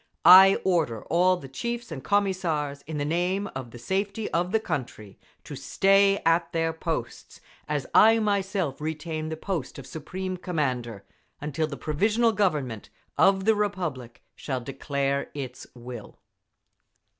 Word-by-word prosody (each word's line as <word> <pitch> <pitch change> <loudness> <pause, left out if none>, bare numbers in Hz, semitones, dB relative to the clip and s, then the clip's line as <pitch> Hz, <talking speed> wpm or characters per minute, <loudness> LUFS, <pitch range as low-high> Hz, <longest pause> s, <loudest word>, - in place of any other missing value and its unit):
I 190 +2 +9
order 160 - 0
all 180 +2 +4
the 140 - -10
chiefs 235 - -5
and 135 -4 -6
Commissars, 175 -8 0
in 155 -1 -4
the 145 - -1
name 180 +5 0
of 130 -2 -6
the 120 - -11
safety 200 - -2
of 175 +2 0
the 220 - +3
country, 120 - -5 0.2
to - - -8
stay 195 0 +3
at 165 +1 +2
their 165 0 0
posts, 160 -7 -5 0.3
as 150 -3 -1
I 225 +1 +7
myself 195 -8 -1
retain 155 0 -4
the 160 - -4
post 165 -6 -4
of 140 - -9
Supreme 185 +6 -5
Commander, 125 - -3 0.3
until 150 +2 -2
the 140 -2 -7
Provisional 215 +10 +1
Government 150 - -1 0.3
of 190 0 +3
the 220 - +5
Republic 175 - -3
shall 130 -3 -3
declare 140 +2 -2
its 130 -3 -7
will…. 120 -2 -10
160 Hz, 145 wpm, -26 LUFS, 140-195 Hz, 0.3 s, I